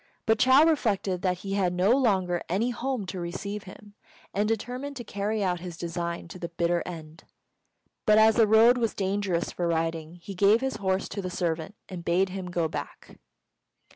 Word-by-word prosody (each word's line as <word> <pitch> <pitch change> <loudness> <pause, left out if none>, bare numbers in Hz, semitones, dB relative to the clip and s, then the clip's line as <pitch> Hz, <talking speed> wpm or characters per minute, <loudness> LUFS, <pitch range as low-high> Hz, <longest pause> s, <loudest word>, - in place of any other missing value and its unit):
But 220 -1 +2
Chou 260 +3 +6
reflected 205 - +1
that 180 -1 0
he 195 - -3
had 185 -3 +1
no 185 +4 +2
longer 190 -9 +2
any 215 +8 +1
home 250 -3 -3
to 185 0 -5
receive 200 +4 -5
him, 205 +2 -13 0.4
and 205 +2 +1
determined 250 +6 -3
to 240 - -6
carry 210 0 -2
out 180 -2 0
his 175 -1 -8
design 170 0 -4
to 185 - -9
the 170 - -5
bitter 170 0 0
end; 160 -2 -9 0.8
but 215 0 +6
as 220 0 +6
the 225 -2 +5
road 230 +3 +6
was 230 -3 0
dangerous 195 -3 -1
for 175 - -2
riding, 165 0 -2
he 175 +3 -9
gave 200 +4 +4
his 265 +1 -2
horse 190 0 -1
to 200 - -4
the 185 - -4
servant, 170 +2 -2
and 180 -3 -7
bade 180 +3 +2
him 185 -1 -5
go 175 -2 0
back. 150 -2 -8
190 Hz, 190 wpm, -27 LUFS, 175-220 Hz, 0.8 s, Chou